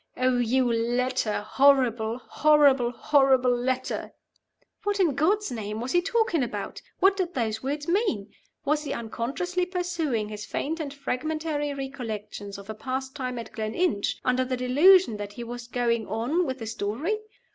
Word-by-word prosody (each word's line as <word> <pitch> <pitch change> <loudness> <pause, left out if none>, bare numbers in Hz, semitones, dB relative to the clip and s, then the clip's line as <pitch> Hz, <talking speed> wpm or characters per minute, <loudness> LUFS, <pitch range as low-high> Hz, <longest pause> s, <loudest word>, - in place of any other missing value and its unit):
Oh, 255 -1 +2
you 250 +2 +2
letter. 240 -1 0
Horrible, 245 -5 +3
horrible, 280 -2 +4
horrible 260 -1 +3
letter.'" 255 +1 -2 0.7
What, 410 -1 -1
in 340 -7 +3
God's 380 +9 +1
name, 215 -2 -4
was 245 +3 -3
he 350 - +4
talking 440 - +1
about? 215 -5 -4 0.2
What 385 +1 +5
did 360 -3 -2
those 220 -3 -1
words 290 +3 -3
mean? 340 - 0 0.3
Was 300 +1 +1
he 290 - -3
unconsciously 280 +11 -2
pursuing 335 - -1
his 210 -1 -6
faint 320 +9 -3
and 295 -3 -4
fragmentary 295 +2 -2
recollections 220 -7 -6
of 200 0 -11
a 220 - -4
past 265 +4 -4
time 255 -3 -3
at 230 - -7
Gleninch, 220 - -1
under 255 0 +2
the 255 0 -2
delusion 285 - +5
that 205 0 -6
he 240 - -6
was 240 0 -7
going 235 -3 0
on 250 - 0
with 260 0 -3
the 225 - -6
story? 230 - -2
255 Hz, 155 wpm, -26 LUFS, 230-310 Hz, 0.7 s, What